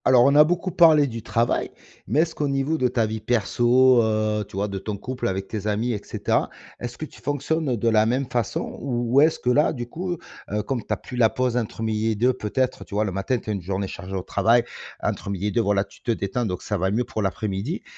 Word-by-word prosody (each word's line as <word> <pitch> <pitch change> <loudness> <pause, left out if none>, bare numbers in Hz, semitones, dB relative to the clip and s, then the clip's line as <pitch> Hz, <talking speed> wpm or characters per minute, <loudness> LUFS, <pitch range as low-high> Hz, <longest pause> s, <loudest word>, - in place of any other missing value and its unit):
Alors, 125 -1 +6
on 140 - +5
a 150 +1 +8
beaucoup 175 +3 -1
parlé 160 -4 +6
du 115 -4 -5
travail 115 +1 0 0.4
mais 140 +9 +3
est-ce 165 0 -1
qu'au 150 -2 -1
niveau 140 +3 0
de 125 - +3
ta 120 -2 +1
vie 110 0 -3
perso, 120 +3 +4
heu, 110 -1 0
tu - - -11
vois, 100 +1 0
de 100 -1 -4
ton 100 +1 -4
couple, 130 +5 -4
avec 95 0 -2
tes 105 -2 -4
amis 110 +4 0
et 105 - -4
cetera, - - -1 0.3
est-ce 120 -1 -6
que 155 - -4
tu - - -16
fonctionnes 145 0 -1
de 115 - -1
la 110 -1 +4
même 130 +4 +1
façon? 120 -4 -2
Ou 120 -3 -1 0.2
ou - - +9
est-ce 160 +1 +4
que 125 - -1
là, 145 +4 +4
du 120 -4 -5
coup, 175 +6 -4 0.3
heu, 105 0 -1
comme 125 +2 -2
tu - - -10
as 105 - +1
plus 125 - -10
la 115 -2 +5
pause 125 -1 -1
entre 115 -2 -2
midi 110 0 0
et - - -1
deux 125 +5 +3
peut-être 130 +2 -2
tu - - -9
vois, 105 +1 +2
le 100 - -2
matin 95 +7 -1
tu 110 - -5
as - - 0
une 100 - -3
journée 95 +2 -2
chargée 95 +1 -7
au 95 - -2
travail 115 +5 +3 0.4
entre - - -2
midi 100 0 -2
et - - 0
deux, 120 - +2
voilà, 100 -2 +2
tu - - -19
te 120 - -1
détends 115 +3 -1
donc 90 -2 -4
ça 105 - -2
va 95 +2 +1
mieux 110 +5 +1
pour 110 - -4
l'après-midi, 100 - -2
115 Hz, 260 wpm, -24 LUFS, 105-130 Hz, 0.4 s, ou